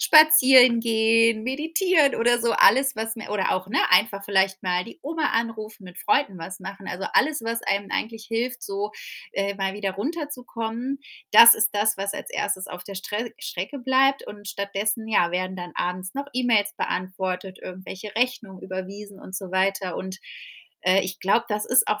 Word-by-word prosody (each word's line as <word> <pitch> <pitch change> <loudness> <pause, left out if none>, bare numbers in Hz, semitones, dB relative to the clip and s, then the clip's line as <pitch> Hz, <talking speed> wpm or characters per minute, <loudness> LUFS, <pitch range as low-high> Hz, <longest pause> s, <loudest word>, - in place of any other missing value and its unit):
Spazierengehen, 235 - +5
Meditieren 315 - +1
oder 240 +1 +2
so. 235 0 +1
Alles, 265 +4 +4
was 225 +1 -3
mir 220 - -9
oder 205 -2 0
auch, 185 +1 -4
ne, - - -2
einfach 200 +1 +3
vielleicht 190 -1 +1
mal 180 -1 0
die 230 - -13
Oma 310 0 -2
anrufen, 220 -3 -3
mit 180 -1 -12
Freunden 205 -4 0
was 185 +3 -8
machen. 195 +1 -8
Also, 185 +2 -5
alles, 300 -2 +2
was 230 0 -2
einem 200 0 -1
eigentlich 220 0 -3
hilft, 235 +2 -3
so, 200 +1 -4 0.4
äh, 200 0 -2
mal 195 -1 -2
wieder 200 -2 -3
runterzukommen, 250 - -4 0.3
das 235 0 +10
ist 215 -1 +2
das, 210 0 +1
was 200 +1 -3
als - - -7
1. 200 -2 -2
auf 180 0 -9
der 200 - -9
Strä 210 +4 -5
Strecke 190 +11 -5
bleibt 265 +2 +2
und 205 0 -10
stattdessen, 200 +3 -3
ja, 175 -6 +2
werden 185 +1 -3
dann 175 -1 -8
abends 185 +1 -4
noch 280 +1 -3
E-Mails 230 -5 +1
beantwortet, 185 0 -3
irgendwelche 185 +3 -9
Rechnungen 230 -6 -2
überwiesen 195 +2 -8
und 185 - -8
so 190 -2 -7
weiter 190 +1 +2 0.2
und, 190 0 -7 0.6
äh, 185 +1 +4
ich 185 0 -5
glaube, 200 +5 +1
das 210 -1 -2
ist 250 - +4
auch 210 0 0
210 Hz, 175 wpm, -24 LUFS, 190-235 Hz, 0.6 s, das